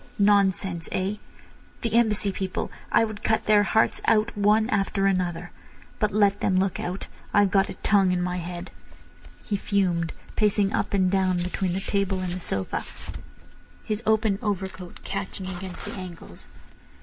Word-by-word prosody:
"Nonsense—eh? 195 -1 +1 0.6
The 230 -2 -2
Embassy 215 -3 +3
people! 190 -1 -3 0.2
I - - +5
would 215 -2 -7
cut 220 - +1
their 210 -1 +5
hearts 220 +2 +2
out 220 0 +3
one 210 +2 +3
after 195 0 +1
another. 180 -2 0 0.5
But 210 - +2
let 205 -1 +3
them 185 - +1
look 190 0 +1
out. 180 +2 -4 0.3
I've 205 -2 +5
got 195 -1 +3
a - - -6
tongue 195 -3 +3
in 180 - +1
my 180 0 -1
head." 175 +1 -6 0.7
He 210 - -2
fumed, 180 -5 0 0.2
pacing 205 -1 +2
up - - 0
and 185 -2 +3
down 190 -2 +2
between 180 +1 -1
the 190 - -2
table 195 -1 0
and 180 -1 -3
the 180 - -4
sofa, 95 - -2 1.0
his 215 0 -2
open 220 -2 +2
overcoat 190 -4 -4
catching 195 -1 -4
against 185 0 -6
the - - -5
angles. 175 - -9
195 Hz, 155 wpm, -25 LUFS, 185-205 Hz, 1.0 s, I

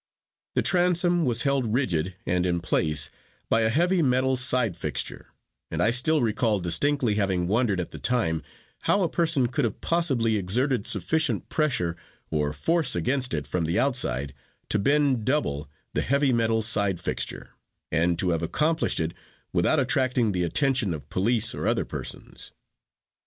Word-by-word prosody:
The - - +2
transom 175 -1 +2
was 120 -3 +1
held 135 -5 0
rigid 90 - -1
and 90 0 0
in 90 -1 0
place 75 -4 0 0.4
by 115 - +3
a 110 - +2
heavy 175 +8 +2
metal 130 -1 +2
side 125 -6 +2
fixture, - - -4 0.4
and - - -4
I 110 - +3
still 135 +4 +2
recall 110 -1 +1
distinctly 115 - +1
having 95 -3 0
wondered 105 -2 +1
at 90 - -4
the - - -8
time 105 -11 0 0.5
how 200 - +3
a - - +2
person 165 -7 +1
could 120 - -2
have 115 -4 -2
possibly 135 -10 +1
exerted 120 +5 0
sufficient 150 - 0
pressure 125 - 0 0.4
or 75 -1 0
force 160 - +1
against 125 +9 0
it 75 -2 -3
from 85 -3 -2
the 85 +4 -1
outside 115 - 0 0.4
to 105 - +2
bend 140 +1 +2
double 95 - -1 0.2
the - - 0
heavy 140 0 +1
metal 115 -1 +1
side 100 -4 +1
fixture, 85 - -4 0.4
and 85 +1 +1
to 90 - 0
have 85 -1 -1
accomplished 155 - 0
it 80 0 -2 0.4
without - - +2
attracting 125 -4 +1
the 90 -2 -1
attention 125 - +1
of 75 - -11
police 115 +3 +1
or - - -3
other - - +1
persons. - - -6
115 Hz, 160 wpm, -25 LUFS, 90-140 Hz, 0.5 s, by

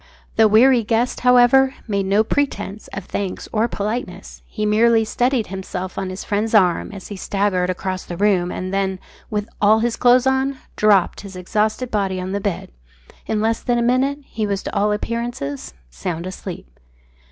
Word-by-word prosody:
The 220 - +6
weary 235 +3 +5
guest, 230 +3 0
however, 250 +2 +5
made 200 -3 -1
no 200 +3 +3
pretence 220 -5 -2
of 195 -2 -7
thanks 195 -2 -4
or 225 +1 +2
politeness. 205 -4 -5
He 215 -1 -3
merely 225 +1 +4
steadied 245 +1 0
himself 185 -1 -5
on 195 -1 -3
his 185 +1 -6
friend's 215 +2 -1
arm 185 -2 +3
as 195 -2 -9
he 205 - -6
staggered 195 -2 0
across 185 0 -3
the 175 - -7
room, 190 -3 +2
and 185 +1 -5
then, 195 -1 0 0.3
with 210 -1 -2
all 210 +1 +5
his 230 +1 0
clothes 250 +1 +4
on, 265 +1 +1 0.2
dropped 205 -4 +3
his 200 -2 -10
exhausted 215 +6 -1
body 195 -3 -1
on 185 +1 -4
the 200 +1 -2
bed. 200 -4 -3 0.6
In 215 -1 0
less 225 +1 +1
than 240 -1 0
a 235 - +1
minute 260 +4 +2
he 220 -5 -3
was 200 -1 -2
to - - -6
all 210 +1 +2
appearances 210 - -4 0.2
sound 160 - -4
asleep. 185 - -7
210 Hz, 175 wpm, -20 LUFS, 190-235 Hz, 0.6 s, The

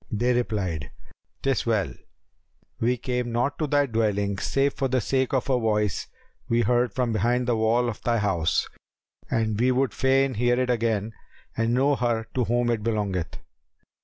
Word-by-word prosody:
They 120 +4 +1
replied, 100 - -2 0.5
"'Tis 135 -3 0
well: 110 -4 +1 0.9
we 125 +2 +1
came 125 0 -2
not 125 +5 -1
to 155 - 0
thy 145 0 +3
dwelling 105 -5 0
save 140 +1 +1
for 135 - -1
the 130 0 +1
sake 130 +3 0
of 130 -1 0
a 130 -2 +2
voice 105 -3 0 0.4
we 115 +1 +3
heard 120 -1 +2
from 125 -3 0
behind 120 +4 +1
the 120 - +2
wall 115 +2 +2
of 115 - -5
thy 120 -1 +1
house, 90 -6 +1 0.6
and 110 -2 0
we 125 +2 +3
would 130 +1 +1
fain 135 0 +2
hear 120 +2 +1
it 125 -1 +1
again 110 -2 0 0.4
and 115 +1 +1
know 140 +3 +3
her 115 -2 0
to 125 -2 +1
whom 120 +1 +1
it 115 -2 -1
belongeth. 105 -6 -2
120 Hz, 170 wpm, -25 LUFS, 110-125 Hz, 0.9 s, thy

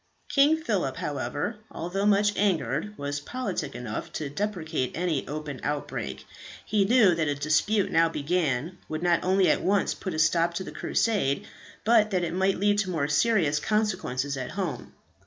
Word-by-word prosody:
King 290 +3 +4
Phillip, 200 - -1
however, 150 +7 -3
although 195 +5 -2
much 205 0 +3
angered, 180 - 0
was 145 0 -3
politic 190 - -4
enough 115 -3 -5
to 145 -3 -4
deprecate 160 -7 -2
any 170 -5 -1
open 150 -2 -5
outbreak. 145 - -4 0.4
He 210 -2 +2
knew 220 -4 +5
that 160 -2 0
a 145 - 0
dispute 155 +8 +1
now 165 0 +4
began, 160 0 -1
would 155 +2 -4
not 175 -1 +2
only 190 +1 +3
at - - +3
once 200 +1 +2
put 185 -5 -5
a - - -3
stop 170 +2 +2
to 190 - -2
the - - -8
Crusade, 195 - 0 0.4
but 220 -1 +4
that 185 -3 0
it 170 -1 -2
might 190 +1 +1
lead 205 +1 +2
to 200 -2 0
more 155 -5 0
serious 155 -2 +2
consequences 145 - -1
at 130 -1 -4
home. - - -4
175 Hz, 170 wpm, -27 LUFS, 145-205 Hz, 0.4 s, knew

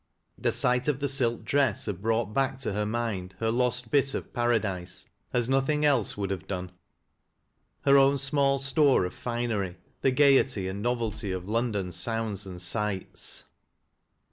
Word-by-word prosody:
The - - 0
sight 125 +2 +1
of 145 -3 +1
the 140 - 0
silk 125 -4 0
dress 140 -6 +1
had 100 -4 -4
brought 110 -1 0
back 135 +1 +1
to 115 - -2
her 105 +1 -1
mind 105 -5 -3
her 115 0 0
lost 125 0 0
bit 140 -1 +2
of - - -6
paradise 110 -7 -1 0.3
as 120 -1 +1
nothing 135 +3 +1
else 135 -9 +2
would 100 -1 -2
have 95 - -4
done 90 -2 -4 0.6
— - - -47
her 140 0 +7
own 135 +1 +4
small 140 0 +3
store 135 - +3
of 90 - -5
finery, 115 -7 -3 0.2
the 135 - +3
gayety 130 -7 +4
and 95 +2 -4
novelty 115 -4 -2
of 95 0 -4
London 105 -4 -1
sounds 110 -2 -2
and 90 -1 -8
sights. 95 +2 -2
115 Hz, 165 wpm, -27 LUFS, 100-135 Hz, 0.6 s, her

